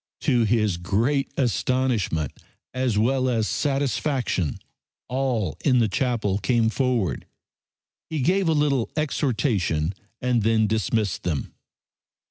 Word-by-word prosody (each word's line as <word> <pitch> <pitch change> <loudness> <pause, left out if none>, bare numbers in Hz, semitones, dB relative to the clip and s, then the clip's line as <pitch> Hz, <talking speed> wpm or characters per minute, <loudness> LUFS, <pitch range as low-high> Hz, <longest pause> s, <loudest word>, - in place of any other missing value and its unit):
To 125 -6 +2
his 105 -4 +1
great 115 +11 0
astonishment 120 - 0 0.4
as 130 -4 0
well 130 +4 +2
as 115 -3 +1
satisfaction 135 - 0 0.5
all 125 - -1
in 130 -3 +4
the 115 -2 +4
chapel 105 -2 0
came 115 +2 +2
forward. 115 - -1 0.8
He 160 -3 -2
gave 185 +6 +2
a - - +3
little 145 -5 +1
exhortation 110 - 0 0.3
and 125 -2 +1
then 110 0 +3
dismissed 105 -2 0
them. 80 -6 -3
120 Hz, 110 wpm, -24 LUFS, 105-135 Hz, 0.8 s, in